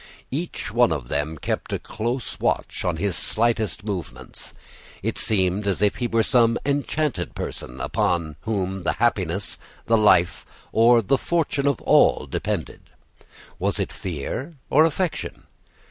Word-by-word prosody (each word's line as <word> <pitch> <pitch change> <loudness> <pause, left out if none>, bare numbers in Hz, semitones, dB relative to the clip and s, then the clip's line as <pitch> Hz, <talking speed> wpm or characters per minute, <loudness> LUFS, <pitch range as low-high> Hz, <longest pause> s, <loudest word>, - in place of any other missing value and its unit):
Each 160 +6 -3
one 120 -3 +4
of 70 -6 -3
them 75 +2 -1
kept - - -3
a - - 0
close 120 +3 -3
watch - - 0
on 90 -2 0
his 95 +1 -1
slightest 110 -5 0
movements. 90 - -5 0.5
It - - -1
seemed 95 0 +1
as 100 - +1
if 105 - +3
he 120 - 0
were 115 -1 +2
some 115 0 +4
enchanted 145 - -1
person 60 +2 -5
upon 80 +2 0
whom 95 -3 -2
the 85 - 0
happiness, 100 -5 0 0.3
the 115 -1 +4
life, 90 -4 +4 0.3
or 115 +1 +5
the 130 +7 +2
fortune 155 -4 0
of 140 -4 +2
all - - +4
depended. - - -4 0.7
Was - - 0
it - - -2
fear 95 - -4 0.2
or 155 +4 +6
affection? 165 +2 -2
110 Hz, 145 wpm, -24 LUFS, 90-125 Hz, 0.7 s, or